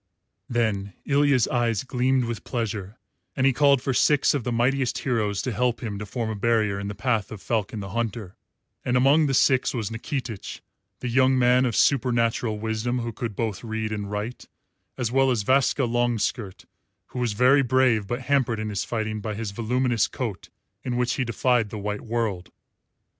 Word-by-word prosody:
Then 105 -5 -1
Ilya's 140 -4 +3
eyes 120 -3 0
gleamed 130 0 +1
with 115 -1 -5
pleasure, 110 -3 -4 0.4
and 130 - +1
he 135 - +4
called 140 -1 +4
for 135 - 0
six 145 +3 +3
of 140 -4 -1
the 125 - -2
mightiest 125 +2 +1
heroes 110 -6 -1
to 130 - -2
help 120 +3 0
him 105 -3 -4
to 105 - -6
form 115 +1 -3
a - - -4
barrier 105 -2 +1
in 100 - -4
the 100 - -5
path 115 -5 -1
of 110 - -7
Falcon 110 0 -2
the 95 - -6
Hunter; 115 -3 -3 0.5
and 125 - +1
among 145 +4 +4
the 135 - +1
six 130 0 +3
was 115 -3 -3
Nikitich, 115 -2 -5 0.4
the 125 - -3
young 130 +2 +3
man 125 +1 +4
of 115 - -2
supernatural 120 -4 +2
wisdom 110 +3 -2
who 115 -1 -3
could 110 -1 -5
both 110 -4 -3
read 110 -1 -3
and 105 -2 -4
write, 105 +4 -5 0.5
as 120 -3 -1
well 135 +1 +3
as 120 -5 +1
Vaska 135 +3 +2
Longskirt, 120 -3 -1 0.4
who 125 - -6
was 120 -3 0
very 130 +6 +5
brave 125 -5 +2
but 120 +4 -3
hampered 125 -3 +1
in 110 0 -3
his 100 - -2
fighting 110 -2 -3
by 105 0 -4
his 110 -1 -4
voluminous 120 +2 +1
coat 115 -8 -5 0.3
in 125 -1 -2
which 125 0 +1
he 135 - -1
defied 120 -1 +1
the 110 - -6
white 105 0 -3
world. 110 -6 -2
120 Hz, 185 wpm, -25 LUFS, 110-125 Hz, 0.5 s, very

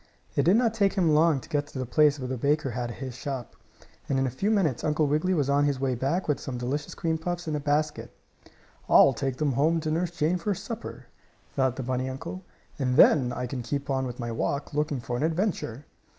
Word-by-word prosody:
It - - +3
did 180 +4 +5
not 230 -2 +2
take 200 -3 +2
him 175 -6 +2
long 155 -1 +4
to - - -13
get 145 -1 -1
to 145 - -9
the 130 - -2
place 150 +3 +4
where 130 -2 -5
the 130 - -2
baker 140 +2 0
had 120 +1 -3
his 130 +2 -6
shop. 130 -1 -6 0.5
And 135 - +1
in 135 - +2
a 130 - -1
few 195 - -1
minutes 185 - +1
Uncle 155 0 +2
Wiggily 155 +6 +1
was 145 -5 +1
on 140 +1 +3
his 140 -2 0
way 135 -1 0
back 135 +10 -1
with 150 - +1
some 130 -2 -5
delicious 135 +5 -3
cream 160 -1 -1
puffs 175 +1 -4
in 155 - -1
a - - -1
basket. 150 +1 -1 0.8
"I'll 135 - +7
take 135 +1 -3
them 150 -2 +1
home 155 +6 +2
to 155 0 -2
Nurse 170 +2 0
Jane 170 +1 0
for 200 +3 -1
supper," 230 +5 -7 0.5
thought 130 -2 +1
the 130 - -4
bunny 130 +1 -1
uncle, 170 +8 -6 0.4
"and 125 -2 0
then 130 -6 +6
I 125 +1 -3
can 125 0 -4
keep 140 +3 -3
on 130 -1 0
with 125 0 -7
my 120 -1 -3
walk, 140 +6 -2
looking 145 -3 -1
for 120 +1 -3
an - - -3
adventure." 160 - -1
145 Hz, 235 wpm, -27 LUFS, 130-160 Hz, 0.8 s, I'll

